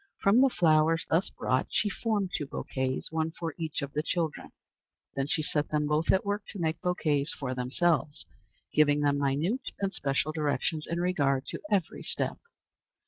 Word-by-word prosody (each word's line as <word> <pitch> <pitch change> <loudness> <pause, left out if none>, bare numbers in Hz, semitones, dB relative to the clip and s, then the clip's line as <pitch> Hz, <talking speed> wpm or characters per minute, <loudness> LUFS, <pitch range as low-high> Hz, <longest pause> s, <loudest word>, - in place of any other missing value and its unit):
From 205 +6 +4
the 270 - +6
flowers 165 -4 +3
thus 170 +5 +2
brought 130 - 0
she 215 - +1
formed 205 -2 -1
two 145 - -2
bouquets, 130 +1 -3
one 160 0 0
for 165 -1 -5
each 155 -2 -3
of 140 - -5
the 150 - 0
children. 165 -1 -2 0.6
Then 135 0 -1
she 155 +1 0
set 150 -1 0
them 150 -1 +1
both 150 +2 +2
at 190 - +2
work 205 +1 -1
to 200 - -8
make 160 -1 -1
bouquets 155 -4 +1
for 130 -2 -3
themselves, 145 +4 0 0.5
giving 150 -1 +4
them 145 -1 +2
minute 145 - 0
and 195 0 -1
special 140 +2 0
directions 155 0 -1
in 170 - -1
regard 140 -7 +1
to - - -6
every 200 -5 0
step. - - -2
155 Hz, 175 wpm, -29 LUFS, 145-175 Hz, 0.6 s, the